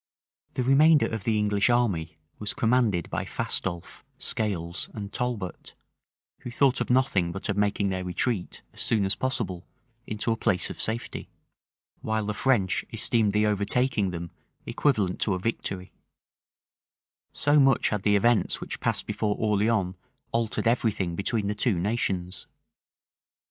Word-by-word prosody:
The 130 - 0
remainder 150 +4 +5
of 110 -4 -4
the 110 -2 +2
English 105 +1 +2
army 100 -10 +1 0.2
was 105 - -4
commanded 115 - +2
by - - -1
Fastolffe, 85 -2 -4
Scales, 90 -5 -2
and 100 -2 -6
Talbot, 115 -8 -4 0.6
who - - -7
thought 130 +2 +2
of - - -2
nothing 125 -9 +2
but 95 +4 -5
of 100 - +1
making 100 -1 +1
their 95 -1 -2
retreat, 90 +2 -2
as - - -8
soon 105 -4 +2
as 95 - +2
possible, 115 -9 -3 0.4
into 110 +2 -2
a - - +2
place 95 -4 0
of - - -5
safety; 115 +2 -2 0.7
while 110 -1 -1
the 105 - -2
French 105 -6 +1
esteemed 110 -3 +2
the 105 0 +3
overtaking 105 +1 +1
them 85 -1 -6 0.3
equivalent 105 -11 0
to 100 - +1
a - - -3
victory; 95 -3 -3 1.4
so 145 +1 +3
much 135 -3 +4
had 105 -2 -1
the 105 +1 +3
events 115 +3 +2
which - - -6
passed - - -1
before 105 0 -1
Orleans 105 -3 +1 0.4
altered 115 0 -1
every 115 -1 +2
thing 90 -4 -3
between 100 +3 0
the 105 - 0
two 105 -2 +1
nations! 95 -3 -2
105 Hz, 150 wpm, -27 LUFS, 95-120 Hz, 1.4 s, remainder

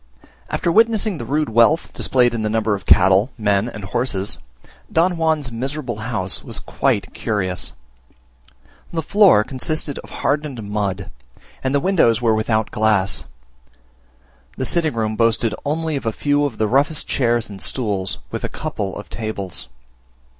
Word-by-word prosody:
After 170 - 0
witnessing 220 -3 +3
the 115 - -6
rude 150 0 0
wealth 115 +9 +3
displayed 125 -2 +2
in 115 - -2
the 110 - 0
number 110 -1 +1
of 100 -2 -5
cattle, 95 +5 +5
men, 105 0 +1
and 105 -3 -8
horses, 100 -1 -1 0.5
Don 170 +3 +3
Juan's 160 -6 0
miserable 130 0 -4
house 110 -4 -2
was - - -7
quite 100 -2 -1
curious. 95 -5 -2 1.2
The 165 -1 -2
floor 195 - +5
consisted 145 +3 -3
of - - -11
hardened 145 -5 -2
mud, 100 -2 -3 0.5
and 130 +1 0
the - - +4
windows 150 - +3
were 115 -2 +2
without 110 0 0
glass; 105 -3 +2 1.3
the - - -1
sitting 160 -6 +1
room 110 -1 -1
boasted 115 0 +2
only 160 +1 -1
of 135 -4 -3
a - - +2
few 145 +5 +1
of 135 -6 -4
the 110 - +1
roughest 140 +6 +1
chairs 120 -3 +1
and 100 -2 -10
stools, 100 -7 -1
with - - -4
a - - -2
couple 95 -2 -4
of 105 - -8
tables. 100 - -5
115 Hz, 155 wpm, -20 LUFS, 105-145 Hz, 1.3 s, cattle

